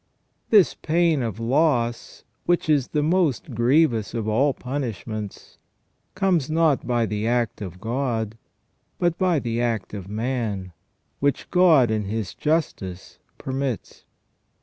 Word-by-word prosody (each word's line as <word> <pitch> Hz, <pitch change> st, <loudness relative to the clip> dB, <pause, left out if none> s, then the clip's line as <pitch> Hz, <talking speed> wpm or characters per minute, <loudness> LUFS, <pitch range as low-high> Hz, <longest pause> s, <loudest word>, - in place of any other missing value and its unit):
This 205 Hz, -5 st, +5 dB
pain 165 Hz, -2 st, +1 dB
of 115 Hz, -2 st, -3 dB
loss, 120 Hz, -1 st, 0 dB, 0.2 s
which 175 Hz, -1 st, +2 dB
is 145 Hz, -5 st, +3 dB
the 150 Hz, -1 st, 0 dB
most 155 Hz, -5 st, +1 dB
grievous 120 Hz, -1 st, +2 dB
of 110 Hz, -2 st, -2 dB
all 130 Hz, +7 st, +3 dB
punishments, 115 Hz, -6 st, -5 dB, 0.6 s
comes 175 Hz, -7 st, +1 dB
not 155 Hz, -5 st, +2 dB
by 120 Hz, -2 st, +2 dB
the 105 Hz, 0 st, -2 dB
act 120 Hz, -3 st, 0 dB
of 90 Hz, -3 st, -7 dB
God, 115 Hz, -1 st, -2 dB, 0.6 s
but 175 Hz, -2 st, +1 dB
by 180 Hz, -3 st, +3 dB
the 120 Hz, -3 st, -1 dB
act 115 Hz, -5 st, -2 dB
of 100 Hz, -2 st, -7 dB
man, 110 Hz, -5 st, -3 dB, 0.5 s
which 140 Hz, 0 st, -1 dB
God 160 Hz, -10 st, +5 dB
in 110 Hz, -2 st, -1 dB
His 105 Hz, -1 st, -3 dB
justice 145 Hz, -, -2 dB, 0.2 s
permits. 135 Hz, -3 st, -4 dB
125 Hz, 125 wpm, -24 LUFS, 110-155 Hz, 0.6 s, This